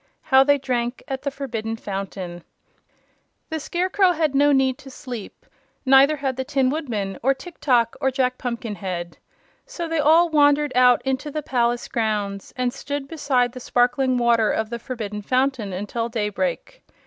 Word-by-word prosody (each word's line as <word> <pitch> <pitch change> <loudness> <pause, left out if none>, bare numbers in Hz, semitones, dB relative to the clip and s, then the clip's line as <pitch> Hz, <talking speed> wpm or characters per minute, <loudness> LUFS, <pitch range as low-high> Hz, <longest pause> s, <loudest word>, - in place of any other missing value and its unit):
How 265 -2 +5
They 285 +1 +4
Drank 250 -2 -2
at 270 -2 -4
the 280 - -2
Forbidden 230 -5 -4
Fountain 190 -4 -6 1.1
The 320 - -2
Scarecrow 365 +4 +1
had 310 -3 0
no 290 +1 +4
need 265 -2 +2
to 270 - -12
sleep; 250 -5 -9 0.4
neither 270 +3 +6
had 270 -3 -3
the 260 - -1
Tin 265 -2 +1
Woodman 220 -11 -3
or 270 +3 +2
Tiktok 260 -7 0
or 265 - +3
Jack 255 -1 -1
Pumpkinhead. 195 -8 -5 0.5
So 345 -9 -5
they 325 -1 -1
all 320 +4 +5
wandered 290 -2 +3
out 250 0 +5
into 265 +3 -1
the 300 +1 -4
palace 240 -2 0
grounds 210 -3 -2
and 250 -1 0
stood 285 0 -5
beside 265 -6 0
the 255 - -9
sparkling 250 +1 +1
water 235 -2 +3
of 220 0 -1
the 235 - -4
Forbidden 220 -5 -5
Fountain 255 -2 0
until 210 +5 -3
daybreak. 240 - -3
255 Hz, 160 wpm, -23 LUFS, 230-285 Hz, 1.1 s, neither